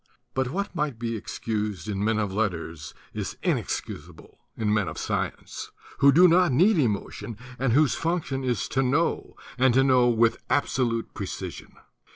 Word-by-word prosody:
But 130 Hz, -1 st, 0 dB
what 200 Hz, +7 st, -3 dB
might 150 Hz, -7 st, -2 dB
be 115 Hz, 0 st, -3 dB
excused 105 Hz, -3 st, -4 dB
in 100 Hz, -1 st, -2 dB
men 110 Hz, +1 st, +2 dB
of 105 Hz, -3 st, -1 dB
letters 85 Hz, -8 st, -3 dB, 0.2 s
is -, -, -4 dB
inexcusable -, -, -4 dB, 0.2 s
in 105 Hz, -2 st, +1 dB
men 105 Hz, -4 st, +1 dB
of 80 Hz, -, -6 dB
science, -, -, -3 dB, 0.3 s
who 140 Hz, 0 st, +7 dB
do 175 Hz, +6 st, +7 dB
not 175 Hz, -1 st, +4 dB
need 180 Hz, -, +4 dB
emotion 115 Hz, -2 st, -2 dB, 0.2 s
and 130 Hz, -3 st, +1 dB
whose 150 Hz, +1 st, +4 dB
function 165 Hz, -6 st, -2 dB
it 130 Hz, -, -1 dB
is 120 Hz, -, -1 dB
to 135 Hz, -, +1 dB
know, 140 Hz, +6 st, 0 dB, 0.2 s
and 130 Hz, -2 st, +4 dB
to 135 Hz, -, +5 dB
know 125 Hz, -2 st, +4 dB
with 115 Hz, -1 st, +2 dB
absolute 125 Hz, -4 st, 0 dB
pre -, -, -5 dB
cision. -, -, -7 dB
125 Hz, 170 wpm, -26 LUFS, 105-140 Hz, 0.3 s, who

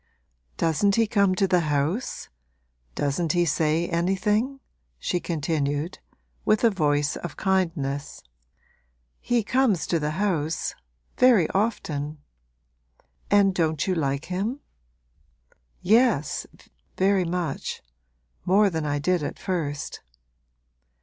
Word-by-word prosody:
'Doesn't 170 Hz, +5 st, +2 dB
he 230 Hz, -, +3 dB
come 200 Hz, -3 st, +2 dB
to 195 Hz, +1 st, +2 dB
the 180 Hz, -1 st, +3 dB
house 155 Hz, -, -1 dB, 0.7 s
doesn't 145 Hz, +3 st, 0 dB
he 175 Hz, -1 st, +2 dB
say 160 Hz, +2 st, +1 dB
anything?' 210 Hz, +9 st, 0 dB, 0.4 s
she 175 Hz, -, -1 dB
continued, 155 Hz, -1 st, -2 dB, 0.4 s
with 215 Hz, +1 st, +2 dB
a 230 Hz, -, +5 dB
voice 145 Hz, -5 st, +1 dB
of 175 Hz, -4 st, -7 dB
kindness. 165 Hz, -8 st, -1 dB, 1.0 s
'He 240 Hz, -1 st, 0 dB
comes 235 Hz, -6 st, +2 dB
to 170 Hz, -, 0 dB
the 150 Hz, 0 st, -2 dB
house 165 Hz, -6 st, -1 dB, 0.5 s
very 235 Hz, -10 st, +6 dB
often.' 155 Hz, -8 st, -1 dB, 1.1 s
'And 200 Hz, -1 st, +4 dB
don't 160 Hz, -3 st, 0 dB
you 190 Hz, -, +1 dB
like 140 Hz, -3 st, -1 dB
him?' 205 Hz, +10 st, -3 dB, 1.2 s
'Yes, 220 Hz, -, +2 dB, 0.5 s
very 190 Hz, 0 st, +3 dB
much 170 Hz, -4 st, -3 dB, 0.6 s
more 200 Hz, +2 st, +4 dB
than 160 Hz, -2 st, -2 dB
I 145 Hz, 0 st, 0 dB
did 175 Hz, +4 st, +1 dB
at 145 Hz, -, -4 dB
first.' 150 Hz, -6 st, -3 dB
175 Hz, 110 wpm, -25 LUFS, 150-200 Hz, 1.2 s, very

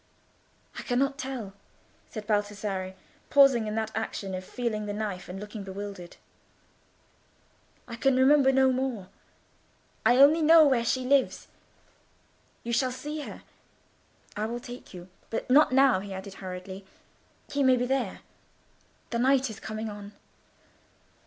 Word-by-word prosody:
"I -, -, -4 dB
cannot 275 Hz, +3 st, 0 dB
tell," 255 Hz, -8 st, -5 dB, 0.6 s
said 215 Hz, -2 st, -7 dB
Baldassarre, 205 Hz, -3 st, -2 dB, 0.3 s
pausing 270 Hz, -6 st, +5 dB
in 210 Hz, -, -3 dB
that 220 Hz, -1 st, -2 dB
action 210 Hz, -3 st, -4 dB
of 185 Hz, 0 st, -4 dB
feeling 215 Hz, -1 st, -3 dB
the 205 Hz, -, -3 dB
knife, 205 Hz, -4 st, -4 dB
and 185 Hz, +2 st, -6 dB
looking 210 Hz, 0 st, -7 dB
bewildered. 195 Hz, -2 st, -8 dB, 1.7 s
"I 230 Hz, -2 st, -7 dB
can 270 Hz, +2 st, +2 dB
remember 265 Hz, +1 st, +5 dB
no 265 Hz, 0 st, +4 dB
more. 250 Hz, -7 st, -3 dB, 0.9 s
I 245 Hz, -, +4 dB
only 290 Hz, +4 st, +6 dB
know 320 Hz, 0 st, +7 dB
where 260 Hz, -5 st, +3 dB
she 255 Hz, +2 st, 0 dB
lives. 275 Hz, +1 st, +1 dB, 1.1 s
You 235 Hz, -, -3 dB
shall 255 Hz, +2 st, +1 dB
see 295 Hz, +5 st, -6 dB
her. -, -, -9 dB, 0.9 s
I 215 Hz, 0 st, -2 dB
will 240 Hz, +1 st, -4 dB
take 245 Hz, 0 st, -10 dB
you; 180 Hz, -1 st, -10 dB, 0.2 s
but 225 Hz, -, -3 dB
not 295 Hz, 0 st, +6 dB
now," 265 Hz, -5 st, +5 dB
he 195 Hz, 0 st, -7 dB
added 190 Hz, +1 st, -8 dB
hurriedly, 185 Hz, +1 st, -7 dB, 0.7 s
"he 285 Hz, -, 0 dB
may 260 Hz, -1 st, +5 dB
be 245 Hz, -, 0 dB
there. 255 Hz, -6 st, -2 dB, 0.9 s
The 235 Hz, -, -1 dB
night 265 Hz, 0 st, +2 dB
is 215 Hz, -, -10 dB
coming 220 Hz, 0 st, -5 dB
on." 205 Hz, -1 st, -8 dB
230 Hz, 140 wpm, -27 LUFS, 205-265 Hz, 1.7 s, know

